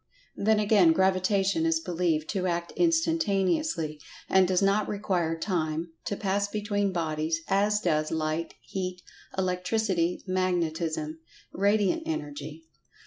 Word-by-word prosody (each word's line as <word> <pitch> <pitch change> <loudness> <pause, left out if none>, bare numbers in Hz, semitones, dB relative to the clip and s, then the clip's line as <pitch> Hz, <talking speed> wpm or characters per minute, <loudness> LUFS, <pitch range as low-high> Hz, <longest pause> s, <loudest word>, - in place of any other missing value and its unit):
Then 215 +1 +2
again, 200 -6 +5
Gravitation 190 0 +2
is 165 0 +2
believed 165 -2 -1
to 185 -3 -1
act 170 -1 -2
instantaneously, 310 - +1 0.3
and 190 -1 +4
does 185 -1 +2
not 200 +1 +2
require 180 -6 -1
Time 165 -2 -2
to 205 - -2
pass 200 0 0
between 205 -1 -1
bodies, 160 -1 -1
as 205 +2 +2
does 155 -5 0
Light, 160 +1 -2
Heat, 185 -1 -5 0.3
Electricity, 180 -1 0
Magnetism—Radiant 180 - -1
Energy. 155 - -5
185 Hz, 110 wpm, -28 LUFS, 165-200 Hz, 0.3 s, again